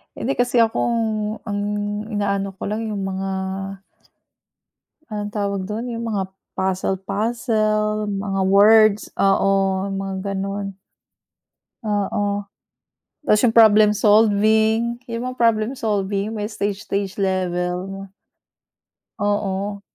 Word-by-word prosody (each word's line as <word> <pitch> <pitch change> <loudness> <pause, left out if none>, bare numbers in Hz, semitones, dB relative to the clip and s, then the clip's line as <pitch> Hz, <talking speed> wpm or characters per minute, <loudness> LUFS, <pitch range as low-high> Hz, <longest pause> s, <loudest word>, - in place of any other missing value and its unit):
Hindi, 270 +4 -2
kasi 245 0 +2
ako 225 -1 +3 0.7
ang 205 -1 -2 0.5
inaano 200 -1 -1
ko - - -4
lang 215 +2 -2
yung 205 - -3
mga 190 0 -3 1.8
Anong 205 -1 -4
tawag 200 -2 -1
dun? 225 +5 -4
Yung 235 0 -4
mga 200 -4 -2 0.2
puzzle-puzzle, 215 +3 0
mga 195 -1 -2
words, 210 +2 +6 0.2
oo 195 0 +3 0.4
mga 195 0 -3 0.2
ganon. 195 0 -4 1.1
Oo, 205 0 -1 0.8
tas 210 -7 +3
yung 235 -2 +3
problem 215 -2 +6
solving, 220 +2 +3
yung 230 0 -4
mga 255 - -12
problem 230 -1 +2
solving 205 -2 -1
may 210 -1 -2
stage 205 -1 -3
stage 200 -2 -2
level. 185 0 -2 1.1
Oo. 205 -1 -1
205 Hz, 100 wpm, -21 LUFS, 195-220 Hz, 1.8 s, words